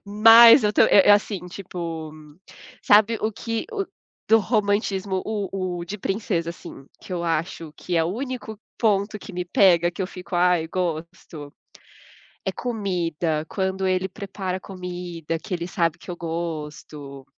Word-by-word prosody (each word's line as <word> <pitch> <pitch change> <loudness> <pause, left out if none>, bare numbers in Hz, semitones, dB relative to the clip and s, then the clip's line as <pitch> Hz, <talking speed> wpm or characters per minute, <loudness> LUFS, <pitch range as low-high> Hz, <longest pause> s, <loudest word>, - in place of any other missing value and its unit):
Mas 225 +3 +8
eu 210 - +2
tô - - +5
e 195 - +5
e - - +7
assim, 205 -3 +2
tipo, 170 -4 -6 0.7
sabe 215 +2 +4
o 220 - -1
que 230 +2 -4
o 400 -3 -2 0.4
do 225 +1 +6
romantismo 200 -3 0
o 195 -4 -3
o - - -5
de 205 +4 -6
princesa 190 -4 -2
assim, 140 -4 -11
que 185 - -10
eu 170 -1 -2
acho 165 -1 -2
que 175 -2 -3
é 165 - +3
o - - -1
único 245 -4 -5 0.2
ponto 210 -1 +1
que 200 - -11
me 180 0 -3
pega, 175 -2 +4
que 190 - -5
eu - - -2
fico: 180 -1 -9
"Ai, 175 -2 +3
gosto", 165 -4 -5 0.9
é - - -1
comida, 175 -9 -2
quando 190 -1 -2
ele 185 0 0
prepara 190 -1 -5
comida 175 -4 -6
que 200 -4 -4
ele 170 0 -3
sabe 165 -2 0
que - - -10
eu 175 - -5
gosto 150 -4 -6
185 Hz, 160 wpm, -23 LUFS, 170-205 Hz, 0.9 s, Mas